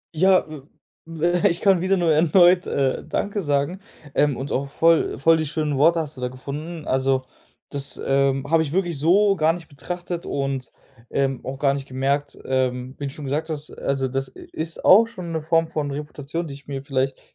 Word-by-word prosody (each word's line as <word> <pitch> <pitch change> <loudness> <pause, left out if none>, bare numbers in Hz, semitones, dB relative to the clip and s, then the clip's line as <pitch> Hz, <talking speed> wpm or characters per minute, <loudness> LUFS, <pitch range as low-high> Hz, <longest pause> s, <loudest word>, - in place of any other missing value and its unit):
Ja, 185 +3 +4
äh, 155 -2 -9 0.4
w 170 +2 0
ich 170 0 -2
kann 195 -4 +4
wieder 190 +1 +2
nur 170 -2 +2
erneut, 175 +3 +5
äh, 135 -2 0
„Danke“ 205 0 -2
sagen, 145 +3 0 0.3
ähm, 145 -3 +2
und 135 +2 -5
auch 140 +2 -1
voll 165 +3 +2
voll 165 +4 +4
die 160 - -1
schönen 150 -1 -1
Worte 165 +4 +4
hast 155 -3 -2
du - - -8
da 125 - 0
gefunden. 145 +6 -7
Also, 130 0 +1 0.5
das, 140 -1 +1
ähm, 135 0 +2
habe 165 +2 +3
ich 155 -2 -3
wirklich 175 -5 0
so 195 +6 +4
gar 160 -2 +2
nicht 170 -2 -9
betrachtet 175 +4 -6
und, 135 -2 -3 0.4
ähm, 135 -2 -1
auch 135 +1 -5
gar 140 0 +2
nicht 140 0 -5
gemerkt, 140 +2 -1
ähm, 130 -1 -1
wie 145 - -3
du - - -3
schon 150 - -6
gesagt 150 +4 -2
hast, 150 -1 -4
also, 135 -1 -2
das 135 0 -4
i - - -12
ist 160 +1 -3
auch 220 +5 +7
schon 185 -7 -8
'ne 160 -1 -2
Form 165 +1 +2
von 155 -3 -3
Reputation, 150 +3 -5
die 145 - -7
ich 140 +1 -13
mir 135 -1 -5
vielleicht 135 -1 -1
150 Hz, 205 wpm, -23 LUFS, 135-170 Hz, 0.5 s, auch